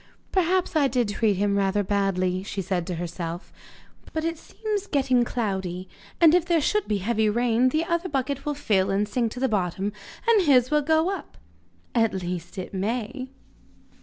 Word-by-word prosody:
'Perhaps 370 -1 +1
I 290 -3 +4
did 245 -4 0
treat 205 0 +1
him 200 +1 +1
rather 200 +1 +1
badly,' 185 -2 0
she 200 +1 -5
said 180 -2 -2
to 180 - -2
herself. 170 +1 -5 0.6
'But 315 0 -2
it 330 -1 -2
seems 420 0 -4
getting 260 -6 +2
cloudy, 190 -6 -3 0.3
and 330 -2 +7
if 355 -1 +4
there 340 -1 +2
should 420 +7 +1
be 210 - +1
heavy 215 +2 +1
rain 240 +2 +2
the 310 +5 0
other 340 +2 -1
bucket 275 0 -2
will 295 0 -2
fill 200 -8 +1
and 200 +2 +1
sink 230 +1 0
to 245 - -7
the 265 - +2
bottom, 195 -2 -1 0.3
and 455 -3 +6
his 255 -2 +5
will 300 0 +4
go 320 +4 +2
up - - -11 0.6
at 225 -4 +2
least 175 -1 -5
it 185 - -6
may! 235 +6 -3
230 Hz, 180 wpm, -25 LUFS, 195-295 Hz, 0.6 s, and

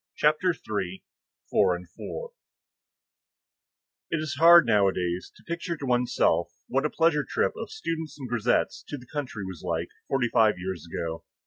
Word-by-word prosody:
CHAPTER 155 +5 +3 0.2
III—FOUR 95 -1 -2
AND 90 0 -9
FOUR 485 - -7 1.8
It - - 0
is 155 -3 -3
hard 170 0 +9
nowadays 95 -5 +1
to - - -19
picture 170 0 -3
to 145 - -5
one's 125 -1 +1
self - - +2 0.2
what - - +1
a - - -8
pleasure 160 -3 +2
trip - - 0
of - - -6
students 165 - -4
and 135 -3 -6
grisettes 120 0 +1
to 145 - -5
the 125 - -13
country 125 -7 -5
was 95 -4 -7
like, 85 +1 -2 0.2
forty 135 -3 +1
five 110 -4 +4
years 90 -3 -5
ago. 80 0 -4
120 Hz, 155 wpm, -27 LUFS, 95-155 Hz, 1.8 s, hard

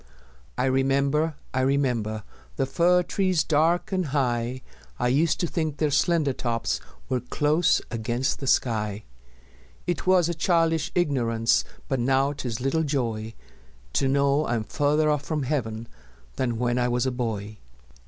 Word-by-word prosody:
I - - +1
remember, 140 +4 +1 0.2
I 130 - +1
remember 125 -6 0 0.3
The - - 0
fir 180 +6 +3
trees 185 -2 +1
dark 160 +5 +1
and 185 -4 0
high; 125 -2 -1 0.3
I 125 - +1
used 150 +5 +2
to - - +1
think 155 -3 -2
their 150 -2 +1
slender 150 0 +2
tops 115 -2 -2 0.3
Were 130 -1 0
close 150 +6 +1
against 120 +3 -1
the 135 - -5
sky: 105 -5 +1 0.8
It 175 0 -2
was 185 -3 +5
a 170 - -1
childish 165 0 +1
ignorance, 120 -9 +2 0.2
But 135 - -1
now 135 +3 +2
'tis 125 -6 -4
little 135 +6 0
joy 115 -7 -2 0.6
To 135 - +2
know 140 +2 +2
I'm 120 -2 0
farther 150 +5 +1
off 150 -2 +2
from 150 0 -2
Heaven 115 -5 -2 0.5
Than 120 -3 -1
when 120 +1 0
I 125 - +2
was 125 +1 0
a 130 - +1
boy. 110 -4 -4
135 Hz, 150 wpm, -25 LUFS, 120-155 Hz, 0.8 s, was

